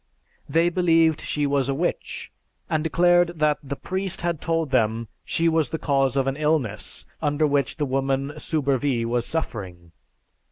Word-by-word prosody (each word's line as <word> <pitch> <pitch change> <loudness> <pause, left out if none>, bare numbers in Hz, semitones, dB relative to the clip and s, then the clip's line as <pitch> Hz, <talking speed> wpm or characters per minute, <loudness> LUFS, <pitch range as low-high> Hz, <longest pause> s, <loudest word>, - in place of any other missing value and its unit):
They 165 +2 +3
believed 165 -3 +3
she 150 -1 -1
was 140 -1 +1
a 135 - 0
witch, 175 +5 -3 0.4
and 155 -3 0
declared 175 +1 +3
that 150 -1 +2
the 140 0 -5
priest 190 +4 -3
had 170 -3 -1
told 165 -3 -1
them 115 -3 +1
she 165 - 0
was 160 -2 +2
the 160 - -2
cause 135 -3 +1
of 135 - +2
an 135 0 -1
illness 150 -9 -1 0.2
under 150 0 +1
which 140 -2 +1
the 150 - 0
woman 135 +1 -1
Soubervie 140 -5 0
was 120 0 -1
suffering. 95 - -4
145 Hz, 160 wpm, -24 LUFS, 135-165 Hz, 0.4 s, They